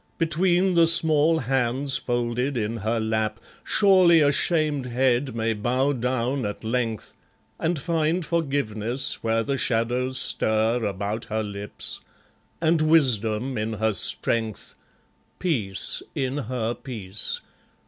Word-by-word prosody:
Between 175 +3 +2
the 170 -1 +5
small 160 -1 +4
hands 130 +2 0
folded 120 +2 -2
in 110 +1 -2
her 115 +2 -1
lap 110 0 -2 0.2
Surely 185 -5 +5
a 145 -1 +4
shamed 150 -4 +1
head 125 +1 0
may 115 0 0
bow 125 +6 0
down 125 +1 -2
at 105 +1 -5
length, 115 -1 -3 0.4
And 165 +1 -1
find 165 +2 -1
forgiveness 135 -7 0
where 115 0 +1
the 135 +3 -2
shadows 125 +3 0
stir 110 +2 +2
About 105 +2 -3
her 110 +1 -2
lips, 100 0 -5 0.6
and 165 0 +2
wisdom 125 -6 +2
in 110 +1 -3
her 110 0 0
strength, 110 +2 -1 0.6
Peace 105 - -1
in 135 +1 -2
her 120 -2 -2
peace. 110 -6 -4
125 Hz, 120 wpm, -24 LUFS, 110-150 Hz, 0.6 s, the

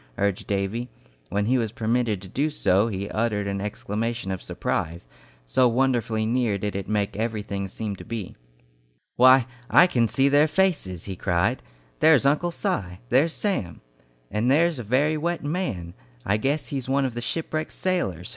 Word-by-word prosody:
urged 100 -1 -1
Davy. 100 +5 -2 0.4
When 100 +1 0
he 125 +3 +2
was 110 -3 -1
permitted 110 -3 0
to - - -9
do 140 +11 0
so 105 -8 +2
he 100 -2 -3
uttered 110 -2 0
an 100 0 -2
exclamation 105 +1 -3
of 95 - -4
surprise, 85 -3 -3 0.4
so 125 - +3
wonderfully 115 -3 +1
near 115 -3 +1
did 100 0 -3
it 100 -1 -4
make 105 -2 0
everything 105 -3 -3
seem 105 +1 -5
to - - -9
be. 115 -5 -6 0.8
"Why, 130 0 +7 0.2
I - - +7
can 120 -10 +2
see 135 +5 +2
their 145 +2 +5
faces!" 150 - 0
he 95 - -6
cried. 95 +7 0 0.4
"There's 155 -4 +5
Uncle 150 +5 +2
Si! 95 - -2
There's 140 +7 +4
Sam! 180 - -2 0.5
And 105 +4 +1
there's 160 +1 +3
a - - -4
very 140 +8 +2
wet 170 +3 -2
man! 145 - -3 0.3
I 100 +2 +2
guess 140 +7 -1
he's 135 -3 -4
one 135 0 +2
of 130 - -2
the 120 - -4
shipwrecked 155 +4 -2
sailors! 135 - -1
115 Hz, 170 wpm, -25 LUFS, 100-140 Hz, 0.8 s, Why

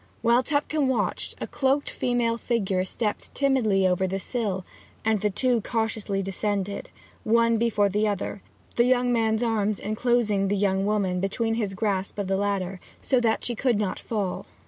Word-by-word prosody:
While 235 +1 +5
Tupcombe 290 +1 0
watched, 260 -2 -1
a - - -3
cloaked 275 +1 0
female 235 -2 0
figure 195 -7 0
stepped 210 +2 -3
timidly 235 -9 +2
over 185 +1 +1
the 190 +1 -2
sill, 195 -4 -2 0.4
and 220 -2 +2
the 210 - +2
two 235 +3 +1
cautiously 220 -3 -1
descended, 200 +1 -2 0.3
one 230 +1 +3
before 215 -3 +2
the 210 +2 +1
other, 200 0 -3 0.4
the 235 - +5
young 250 -1 +3
man's 220 0 +2
arms 215 -3 +1
enclosing 215 -2 +1
the 205 - +1
young 195 0 +1
woman 195 -4 +1
between 225 +4 0
his 210 -4 -2
grasp 195 -1 -1
of 205 - -1
the 195 +1 0
ladder, 195 -2 -1 0.2
so 260 - +3
that 225 -2 +1
she 240 - 0
could 240 -1 +1
not 205 -2 -1
fall. 200 -5 -3
215 Hz, 170 wpm, -26 LUFS, 195-235 Hz, 0.4 s, While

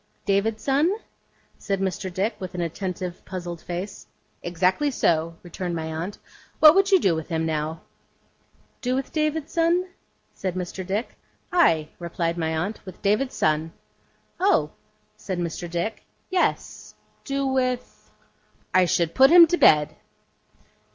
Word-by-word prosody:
'David's 210 +2 0
son?' 295 +8 +2 0.6
said 195 -1 -2
Mr. 190 0 -2
Dick, 195 +5 -1
with 185 -1 -7
an 175 - -2
attentive, 180 +1 -4
puzzled 175 -2 -6
face. 180 +3 -6 0.3
'Exactly 185 - +1
so,' 165 - 0
returned 175 0 -4
my 160 -1 -4
aunt. 170 +6 -4 0.4
'What 305 -1 +9
would 390 +1 +3
you 380 - +7
do 190 - +2
with 160 -1 -4
him, 160 -1 -1
now?' 160 0 -2 1.0
'Do 255 0 0
with 270 0 -3
David's 305 -1 -1
son?' 345 +2 +2 0.4
said 185 -2 -4
Mr. 185 +1 -4
Dick. 200 +6 -3 0.3
'Ay,' 165 - +3
replied 170 -1 -2
my 160 -2 -1
aunt, 200 +7 -3
'with 185 - -11
David's 210 +6 +1
son.' 155 +1 0 0.7
'Oh!' 390 +2 +3 0.5
said 185 -2 -4
Mr. 175 0 -4
Dick. 175 +6 -3 0.3
'Yes. 370 -1 -1 0.3
Do 275 -1 -2
with 255 -2 -2 0.6
I 185 -1 +5
should 170 -1 +1
put 265 +1 +6
him 340 +1 +10
to 330 - +1
bed. 150 0 +5
185 Hz, 140 wpm, -24 LUFS, 170-265 Hz, 1.0 s, him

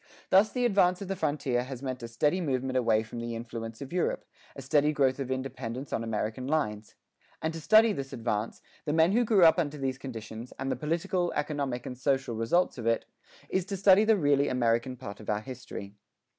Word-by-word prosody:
Thus 200 +3 +5
the 250 -1 0
advance 185 -5 +3
of 195 - -8
the 195 - -1
frontier 145 -7 0
has 130 0 -8
meant 130 -1 -4
a 115 - -5
steady 150 +10 +1
movement 130 -4 -1
away 115 -3 +3
from 115 +2 -8
the 115 0 -4
influence 115 +1 -6
of 135 - -10
Europe, 180 - -1 0.3
a 135 - -7
steady 150 +2 +3
growth 135 -2 +2
of 135 -2 -3
independence 130 0 -4
on 115 - -1
American 115 +3 -3
lines. 110 -9 -2 0.4
And 160 +1 -2
to 165 - -6
study 220 +6 +6
this 135 -4 -5
advance, 115 -2 -3 0.2
the 150 - -1
men 160 +2 +4
who 240 +4 +3
grew 210 -6 +5
up 165 +2 +6
under 150 -3 -1
these 135 -1 -2
conditions, 115 -2 -8
and 135 - -2
the - - 0
political, 170 +3 -1
economic, 145 -5 -2
and 125 - -5
social 135 -1 0
results 115 +8 +1
of 115 - -3
it, 115 0 +1 0.4
is 190 - 0
to 195 0 -4
study 195 +1 +6
the 220 -1 +4
really 145 -4 +3
American 120 +1 0
part 100 -5 -8
of 110 - -9
our 105 0 0
history. 120 -5 -8
135 Hz, 210 wpm, -29 LUFS, 115-160 Hz, 0.4 s, study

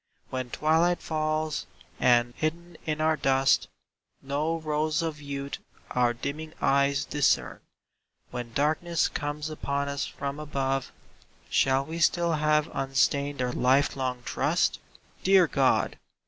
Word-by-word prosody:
When 130 -1 -3
twilight 165 +6 +2
falls, 155 -1 -2 0.3
and, 120 -1 +4
hidden 170 +2 -3
in 155 -1 -1
our 155 0 +3
dust, 135 -1 +3 0.5
No 150 +4 -1
rose 155 0 0
of 155 -2 -4
youth 140 -1 -5 0.3
our 125 -1 +3
dimming 150 +6 -5
eyes 140 +1 +2
discern, 145 -2 +1 0.7
When 120 -1 -5
darkness 155 +5 +1
comes 150 +1 -4
upon 140 -2 -2
us 140 -1 -2
from 140 +1 -5
above; 135 -3 -2 0.6
Shall 135 0 +3
we 165 +3 -5
still 170 +1 +3
have 150 0 +2
unstained 135 +1 +1
our 125 -1 -1
life 135 +3 +3
long 130 -2 -3
trust? - - +1 0.4
Dear 190 -1 +6
God! 135 -4 +1
145 Hz, 125 wpm, -27 LUFS, 135-155 Hz, 0.7 s, Dear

